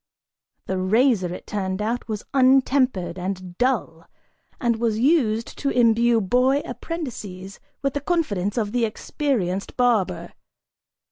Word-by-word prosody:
The 190 Hz, 0 st, -2 dB
razor, 205 Hz, -1 st, +2 dB
it 180 Hz, -, -7 dB
turned 190 Hz, -2 st, -3 dB
out, 230 Hz, +4 st, -2 dB
was 215 Hz, -2 st, -4 dB
untempered 255 Hz, -9 st, +3 dB
and 185 Hz, -1 st, -5 dB
dull 220 Hz, -11 st, -1 dB, 0.5 s
and 235 Hz, -3 st, +1 dB
was 225 Hz, -2 st, 0 dB
used 230 Hz, -4 st, +1 dB
to 280 Hz, -, 0 dB
imbue 235 Hz, -1 st, +3 dB
boy 250 Hz, +7 st, +2 dB
apprentices 205 Hz, -, -6 dB, 0.2 s
with 275 Hz, -1 st, 0 dB
the 285 Hz, -, -2 dB
confidence 235 Hz, -, -1 dB
of 210 Hz, -3 st, 0 dB
the 245 Hz, 0 st, 0 dB
experienced 215 Hz, -4 st, -2 dB
barber. 240 Hz, -6 st, +1 dB
230 Hz, 125 wpm, -23 LUFS, 190-255 Hz, 0.5 s, untempered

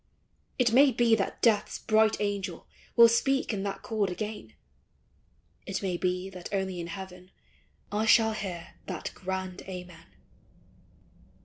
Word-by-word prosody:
It 240 Hz, -3 st, +2 dB
may 275 Hz, +2 st, +7 dB
be 240 Hz, -2 st, +3 dB
that 205 Hz, -3 st, 0 dB
Death's 215 Hz, -3 st, +3 dB
bright 220 Hz, 0 st, +3 dB
angel 200 Hz, -4 st, -3 dB, 0.3 s
Will 235 Hz, -1 st, +9 dB
speak 265 Hz, +2 st, +1 dB
in 200 Hz, -, -2 dB
that 200 Hz, 0 st, -4 dB
chord 215 Hz, -4 st, 0 dB
again; 210 Hz, -, -6 dB, 1.1 s
It 195 Hz, +1 st, -3 dB
may 185 Hz, -2 st, -1 dB
be 180 Hz, +1 st, -1 dB
that 180 Hz, -2 st, -8 dB
only 190 Hz, -2 st, -2 dB
in 170 Hz, -, -4 dB
heaven 185 Hz, 0 st, -9 dB, 0.6 s
I 215 Hz, +2 st, 0 dB
shall 220 Hz, 0 st, +5 dB
hear 185 Hz, -5 st, -6 dB
that 180 Hz, -4 st, -4 dB
grand 190 Hz, -1 st, -4 dB
Amen. 180 Hz, -3 st, -9 dB
195 Hz, 135 wpm, -28 LUFS, 180-220 Hz, 1.1 s, Will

